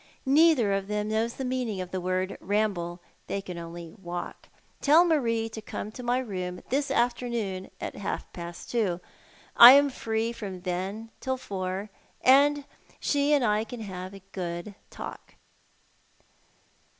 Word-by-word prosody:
Neither 275 -6 +5
of 195 0 -1
them 210 0 -2
knows 225 +2 0
the 265 - -4
meaning 250 -6 -2
of 180 -1 -5
the 185 - -2
word 185 +1 -1
ramble. 185 -3 -1 0.3
Tliey 200 0 -3
can 180 -2 -6
only 170 0 -8
walk. 175 -1 -6 0.3
Tell 315 +5 +6
Marie 230 -9 +1
to 220 0 -7
corao 215 0 -6
to 250 - -8
my 245 0 +1
room 185 -7 -4
this 280 +2 0
afternoon 235 -6 -1
at - - -5
half 200 - -4
past 170 -1 -8
two. 205 -8 0 0.6
I 240 +2 +12
am 285 0 +5
free 225 -1 -1
from 195 -6 -7
then 190 +5 -4
till 260 0 -2
four, 195 -2 -4 0.3
and 285 +2 +5 0.3
she 285 0 +1
and 285 -4 +4
I 210 0 +2
can 230 +1 -8
have 185 -2 -6
a 195 - -13
good 175 +1 -5 0.2
talk." - - -9
210 Hz, 150 wpm, -27 LUFS, 185-245 Hz, 0.6 s, I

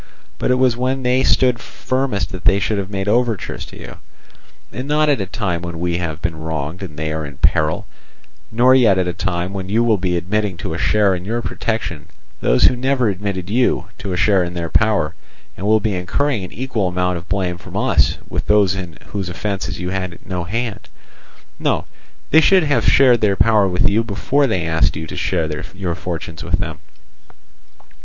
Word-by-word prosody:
But - - 0
it 125 - +4
was 130 -2 +3
when 130 +2 -1
they 125 +1 +2
stood 125 -3 +3
firmest 120 -8 -2
that 95 -2 -8
they 100 -2 +5
should 105 0 0
have 95 -1 -4
made 95 -1 -3
overtures 115 -1 0
to - - -12
you, - - -9 0.8
and 130 +2 -5
not 150 +1 +2
at 140 -7 +2
a 95 - -3
time 95 -5 -2
when 85 -1 -6
we 85 0 -1
have 80 -2 -4
been 85 -2 -2
wronged 80 +1 -4
and 80 -6 -8
they 80 0 -2
are 80 0 -3
in 70 -2 -8
peril; 75 +2 +1 0.7
nor 120 +3 +5
yet 115 -7 +5
at 90 -1 +1
a 90 - -1
time 90 +1 -2
when 95 -1 -5
you 115 +4 +2
will 110 -4 +2
be 90 -1 0
admitting 95 +1 -1
to 80 - -4
a 80 - -4
share 105 -2 +3
in 90 -1 -4
your 115 +4 -2
protection 90 -8 -3 0.3
those - - +3
who - - +6
never 130 -2 +1
admitted 95 -2 -3
you 105 -4 +1
to 100 -5 -4
a 90 - -1
share 95 +1 +3
in 85 0 -5
their 85 -1 -3
power, 105 -8 +2 0.4
and 95 - -4
will 110 +1 +5
be 105 0 -1
incurring 105 +6 -1
an 90 - -7
equal 120 -5 -2
amount 90 0 0
of 85 - -16
blame 90 -2 -1
from - - -8
us - - +2
with - - -4
those 105 -3 +4
in 90 -4 -6
whose 95 -2 -4
offences 100 +2 -3
you 90 0 -3
had 95 -3 -3
no 90 -2 -3
hand. 115 +2 -4 0.7
No, - - 0 0.5
they 160 - +7
should 190 +1 +5
have 145 -2 +1
shared 125 -4 +5
their 100 -2 +3
power 105 -1 +4
with 90 -1 +2
you 110 +3 +2
before 130 +6 +1
they 95 -8 -1
asked 80 0 +1
you 80 +1 -4
to - - -8
share 75 -2 -1
your 95 -3 -2
fortunes 80 -2 -6
with 90 +1 0
them. 85 -4 -4
95 Hz, 205 wpm, -19 LUFS, 90-115 Hz, 0.8 s, they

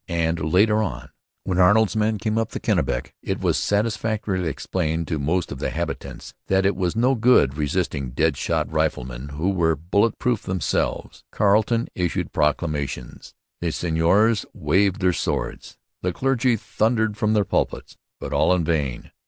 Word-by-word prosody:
And 85 -1 0
later 105 +4 +4
on, 105 - -4 0.3
when 95 -1 -1
Arnold's 105 +4 +4
men 110 0 +1
came 110 +1 -2
up 115 - -3
the - - -3
Kennebec, - - -1
it - - -3
was - - +1
satisfactorily 105 -3 -1
explained 80 +1 -2
to 80 -3 -1
most 80 +5 -1
of 70 - -6
the - - -1
habitants - - -5
that 95 0 +2
it 100 -1 +2
was 90 0 -1
no 125 +4 +3
good 115 - +4
resisting 75 -3 -1
dead 75 +4 +1
shot - - -1
riflemen 65 +2 -2
who 75 +7 -1
were 85 -4 +2
bullet 100 +9 +1
proof 120 -4 0
themselves. 95 -3 -2
Carleton 110 +3 +2
issued 90 -2 -2
proclamations. 75 -1 -2 0.2
The 85 - -1
seigneurs 90 +8 +2
waved 100 -1 +1
their 90 -1 +3
swords. - - -3 0.2
The 90 - 0
clergy 130 +2 +1
thundered 110 0 0
from 105 0 +1
their 105 -2 +2
pulpits. - - -2 0.2
But - - -5
all 90 - +3
in 90 - 0
vain. 75 -6 -2
95 Hz, 160 wpm, -23 LUFS, 80-110 Hz, 0.3 s, later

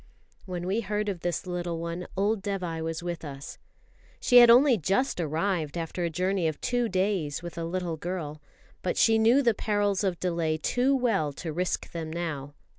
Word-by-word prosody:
When 180 -1 -4
we 200 +5 0
heard 210 0 -2
of 190 -3 -3
this 175 +2 -2
little 175 -2 -3
one, 170 +2 -4
old 205 +1 +1
Dévai 180 -5 -3
was 165 +1 -3
with 175 -1 -4
us. 140 -1 -8 0.6
She 245 - +5
had 240 -1 +9
only 250 +2 +7
just 195 - 0
arrived 165 0 -1
after 170 +2 -3
a 170 - 0
journey 185 +1 0
of 155 - -3
two 245 -2 0
days 185 -6 -1
with 175 - -7
a 170 - -4
little 175 -1 -3
girl, 155 -3 -5 0.4
but - - -2
she 225 -1 +5
knew 235 +6 +5
the 235 -3 +4
perils 205 -2 0
of 185 -3 -1
delay 170 -3 0
too 250 - +1
well 220 - +1
to 160 +2 -5
risk 180 +3 -2
them 160 -2 -5
now. 150 -4 -4
180 Hz, 190 wpm, -27 LUFS, 165-205 Hz, 0.6 s, had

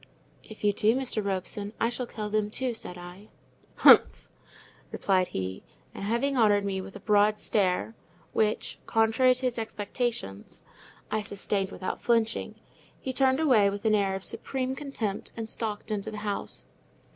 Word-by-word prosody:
"If 220 - -13
you 205 -1 +4
do, 215 +3 +3
Mr. 255 -5 -1
Robson, 200 +1 -3
I 230 - +2
shall 245 +1 -3
kill 210 -2 -5
them 215 -1 +1
too," 250 +3 -2
said 180 -5 -7
I. 180 +4 -11 0.5
"Humph!" - - +6 0.6
replied 185 -2 +2
he, 95 0 -4 0.3
and - - -7
having 235 +7 0
honoured 205 -4 +4
me 190 -1 -1
with 195 +1 -10
a - - -7
broad 210 +1 +3
stare—which, 205 +1 -1
contrary 225 +3 +4
to 255 +1 -4
his 240 -2 0
expectations, 215 - -4 0.5
I 215 - +1
sustained 200 -1 -2
without 185 - -5
flinching—he 230 +2 -2
turned 265 +1 +3
away 245 -10 +5
with 200 +3 -6
an 220 - +4
air 200 -2 +2
of 190 - -6
supreme 260 +4 -2
contempt, 255 -9 -4
and 225 -1 -4
stalked 215 -1 -4
into 205 -2 -2
the 215 - -6
house. 205 -1 -3
215 Hz, 155 wpm, -28 LUFS, 200-235 Hz, 0.6 s, Humph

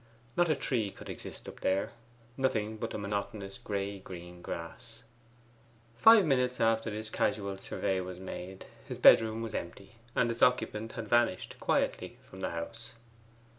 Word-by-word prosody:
Not 175 -1 +3
a 155 - +4
tree 115 -6 0
could - - -9
exist - - -9
up - - -9
there: 95 +1 +1 0.4
nothing 110 -5 0
but 115 +1 -3
the - - -4
monotonous 100 -1 -4
gray 100 -1 -3
green 90 -1 -10
grass. 115 +9 -7 0.9
Five 210 - +8
minutes 125 -4 +2
after 115 0 +2
this 110 +1 -5
casual 100 -2 0
survey 95 0 -1
was 90 0 -7
made 95 0 -7 0.2
his - - -5
bedroom 110 0 +6
was 110 -1 -5
empty, 100 +5 -6 0.2
and 120 - +3
its 115 - -6
occupant 115 -3 +2
had 115 -2 -5
vanished 120 -4 +2
quietly - - 0
from 95 - -12
the - - -1
house. 110 +8 -6
110 Hz, 155 wpm, -31 LUFS, 95-115 Hz, 0.9 s, Five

